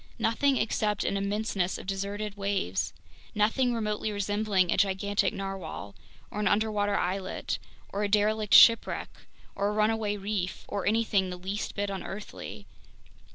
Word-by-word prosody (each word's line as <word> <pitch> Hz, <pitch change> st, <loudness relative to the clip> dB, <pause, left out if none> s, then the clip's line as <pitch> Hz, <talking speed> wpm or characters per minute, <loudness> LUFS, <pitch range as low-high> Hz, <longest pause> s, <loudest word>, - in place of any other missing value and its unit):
Nothing 265 Hz, +4 st, +2 dB
except 210 Hz, -2 st, 0 dB
an -, -, 0 dB
immenseness 200 Hz, -2 st, -1 dB
of -, -, -9 dB
deserted 200 Hz, +2 st, -3 dB
waves! 195 Hz, -, -1 dB, 0.4 s
Nothing 225 Hz, +5 st, +2 dB
remotely 215 Hz, -2 st, -1 dB
resembling 205 Hz, -2 st, +1 dB
a -, -, +1 dB
gigantic 200 Hz, 0 st, +2 dB
narwhale, 195 Hz, -, -6 dB, 0.4 s
or -, -, -4 dB
an 210 Hz, -, +1 dB
underwater 205 Hz, 0 st, +1 dB
islet, 185 Hz, +1 st, -2 dB, 0.3 s
or 200 Hz, -, -1 dB
a 205 Hz, -, 0 dB
derelict 210 Hz, 0 st, +3 dB
shipwreck, 230 Hz, -1 st, +6 dB, 0.4 s
or 200 Hz, +1 st, 0 dB
a -, -, 0 dB
runaway 215 Hz, -1 st, +1 dB
reef, 195 Hz, -2 st, -3 dB
or 200 Hz, -, -3 dB
anything 210 Hz, -3 st, +2 dB
the 180 Hz, -, -5 dB
least 190 Hz, +4 st, -4 dB
bit 205 Hz, -1 st, -1 dB
unearthly! 195 Hz, +1 st, -7 dB
205 Hz, 140 wpm, -28 LUFS, 195-215 Hz, 0.4 s, shipwreck